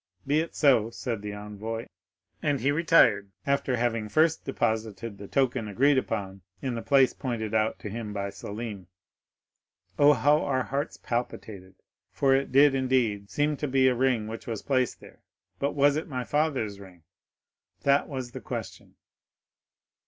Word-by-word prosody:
'—'Be 145 +3 +2
it 165 +1 -3
so,' 125 -7 +4
said 115 -2 -4
the 105 0 -5
envoy; 105 +2 -6 0.6
and 145 -2 0
he 140 +4 +2
retired, 145 -11 +4 0.2
after 140 -2 +1
having 115 -2 -1
first 160 +5 +2
deposited 110 -4 -2
the 100 - -8
token 125 -4 0
agreed 135 +7 +3
on 95 -1 -4 0.2
in 130 -3 -3
the 115 - -4
place 135 -1 +4
pointed 115 -5 -4
out 110 0 +1
to - - -8
him 110 +1 -5
by 100 -1 -3
Selim. 100 -1 -7 1.1
"Oh, 145 0 +7
how 145 +4 +3
our 130 -2 0
hearts 140 +4 -3
palpitated; 105 -5 -5 0.4
for 135 -1 +2
it 135 -1 -1
did, 140 +2 +6
indeed, 125 -7 0
seem 150 +1 0
to 150 - -2
be 130 0 +3
a 130 - +4
ring 125 -3 +1
which 110 +1 -7
was 115 -3 -4
placed 130 -3 0
there. - - -16 0.4
But 140 +1 0
was 140 0 +4
it 155 - -3
my 130 -5 -3
father's 135 -9 -1
ring? 90 -4 -14 0.8
that 140 0 +3
was 130 -4 -5
the - - -8
question. - - -7
120 Hz, 160 wpm, -27 LUFS, 105-140 Hz, 1.1 s, Oh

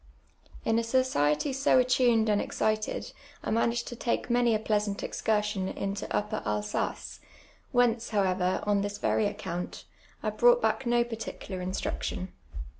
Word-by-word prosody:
In 225 0 +3
a - - -1
society 230 - +1
so 275 0 +3
attuned 245 -3 +4
and 210 -1 +3
excited 215 0 -1 0.3
I - - -2
managed 235 +1 +1
to 240 - -6
take 235 +1 -1
many 240 -2 +3
a - - +1
pleasant 210 -2 -1
excursion 210 -3 0
into 200 +1 -3
Tapper 210 +1 -1
Alsace, 105 0 -2 0.5
whence, 240 -2 +2
however, 185 -3 +1
on 205 -1 +2
this 205 0 -3
very 210 - +1
account, 180 -3 -5 0.4
I - - 0
brought 485 0 +5
back 270 - 0
no 240 0 +4
particular 225 -5 -6
instruction. 185 0 -3
215 Hz, 140 wpm, -29 LUFS, 195-240 Hz, 0.5 s, brought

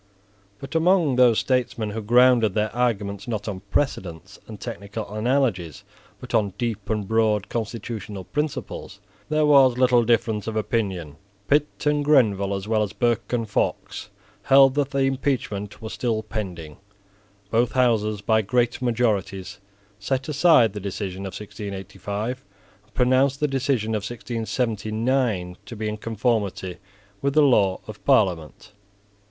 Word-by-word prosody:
But 135 +7 -9
among 165 -4 +3
those 125 -3 +5
statesmen 120 -4 0
who 110 +2 -4
grounded 120 -1 +4
their 110 +1 -1
arguments, 105 -5 -1
not 110 -3 -3
on 100 -3 -4
precedents 95 - -2
and 110 -2 -9
technical 100 +2 -6
analogies, 110 - 0 0.4
but - - -10
on 100 -4 +1
deep 115 -5 -3
and 105 -3 -1
broad 110 -2 +1
constitutional 110 -3 -5
principles, 150 - -4 0.3
there 155 0 +2
was 135 -4 +5
little 125 -2 +4
difference 115 -2 +1
of 110 - -3
opinion. 95 -8 -2 0.3
Pitt 150 +1 +1
and 150 0 +2
Grenville, 105 -9 +3
as 95 +1 -5
well 110 -1 +1
as 105 -2 -2
Burke 120 -1 0
and 115 -2 -1
Fox, 105 - -2 0.3
held 135 -1 +6
that 140 -1 0
the 140 0 -1
impeachment 130 -7 -2
was 110 - -6
still 115 -3 -1
pending 90 -8 -6 0.7
Both 115 +1 +2
Houses 110 -5 +1
by 110 +1 +2
great 120 +4 0
majorities 105 -5 -1 0.4
set 130 +6 -2
aside 145 - +4
the 105 - -5
decision 95 -1 -5
of 95 - -8
1685, 100 +3 -6 0.4
and 105 - -32
pronounced 130 +2 +3
the 150 - +2
decision 135 -5 0
of 110 - +1
1679 115 -3 -2
to 120 - -7
be 110 0 -3
in 105 0 -3
conformity 105 -5 -2 0.4
with 140 0 0
the 155 - +6
law 100 -9 +3
of 110 -1 -10
Parliament. 95 - +1
110 Hz, 140 wpm, -23 LUFS, 100-125 Hz, 0.7 s, held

